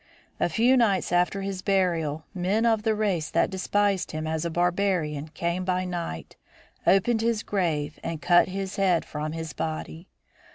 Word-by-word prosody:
A -, -, +2 dB
few 240 Hz, +9 st, +4 dB
nights 200 Hz, -8 st, +2 dB
after 180 Hz, +3 st, +1 dB
his 195 Hz, -1 st, -4 dB
burial 165 Hz, -6 st, 0 dB
men 195 Hz, +5 st, 0 dB
of 225 Hz, -2 st, +3 dB
the 220 Hz, 0 st, +1 dB
race 195 Hz, -7 st, 0 dB
that -, -, +1 dB
despised 195 Hz, 0 st, 0 dB
him 155 Hz, 0 st, -3 dB
as 160 Hz, 0 st, -2 dB
a 170 Hz, -, -1 dB
barbarian 175 Hz, -4 st, 0 dB
came 170 Hz, +3 st, -2 dB
by 185 Hz, 0 st, 0 dB
night, 170 Hz, -, -5 dB, 0.5 s
opened 220 Hz, +4 st, +4 dB
his 225 Hz, -1 st, 0 dB
grave 160 Hz, -6 st, -1 dB
and 165 Hz, -2 st, -3 dB
cut 175 Hz, +1 st, +4 dB
his 195 Hz, +1 st, -4 dB
head 185 Hz, -4 st, +2 dB
from 150 Hz, +1 st, -4 dB
his 160 Hz, -1 st, -5 dB
body. 160 Hz, +2 st, -5 dB
180 Hz, 165 wpm, -26 LUFS, 160-200 Hz, 0.5 s, few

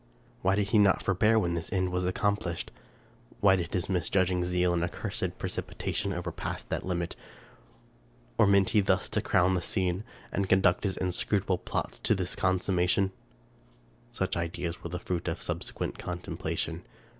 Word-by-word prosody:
Why 95 Hz, +1 st, +3 dB
did 100 Hz, 0 st, 0 dB
he 110 Hz, -, +4 dB
not 100 Hz, -2 st, +4 dB
forbear 105 Hz, +4 st, +3 dB
when 90 Hz, -5 st, +1 dB
this 85 Hz, -1 st, -3 dB
end 95 Hz, -1 st, +1 dB
was 90 Hz, 0 st, 0 dB
accomplished? 95 Hz, -2 st, -1 dB, 0.7 s
Why 95 Hz, -1 st, +6 dB
did 90 Hz, -3 st, -3 dB
his 90 Hz, -, -1 dB
misjudging 90 Hz, 0 st, +1 dB
zeal 90 Hz, 0 st, +2 dB
and 85 Hz, -1 st, +1 dB
accursed 85 Hz, -, -3 dB
precipitation 100 Hz, -, -2 dB
overpass 85 Hz, -2 st, -4 dB
that -, -, -3 dB
limit? 85 Hz, -2 st, -2 dB, 1.2 s
Or 110 Hz, -, +7 dB
meant 100 Hz, -1 st, +4 dB
he 105 Hz, -, +5 dB
thus 95 Hz, -1 st, +2 dB
to -, -, 0 dB
crown 90 Hz, +1 st, +3 dB
the 90 Hz, -, +1 dB
scene, 90 Hz, +2 st, 0 dB, 0.3 s
and 100 Hz, -1 st, -1 dB
conduct 95 Hz, 0 st, +4 dB
his 95 Hz, -, -1 dB
inscrutable 95 Hz, +1 st, 0 dB
plots -, -, -3 dB
to 110 Hz, -, +2 dB
this 90 Hz, -2 st, -1 dB
consummation? 95 Hz, +1 st, +2 dB, 1.0 s
Such 95 Hz, 0 st, -1 dB
ideas 85 Hz, 0 st, -3 dB
were -, -, -4 dB
the 90 Hz, -, -3 dB
fruit 90 Hz, -1 st, -3 dB
of -, -, -1 dB
subsequent -, -, -4 dB
contemplation. 90 Hz, 0 st, -3 dB
90 Hz, 155 wpm, -29 LUFS, 90-95 Hz, 1.2 s, Or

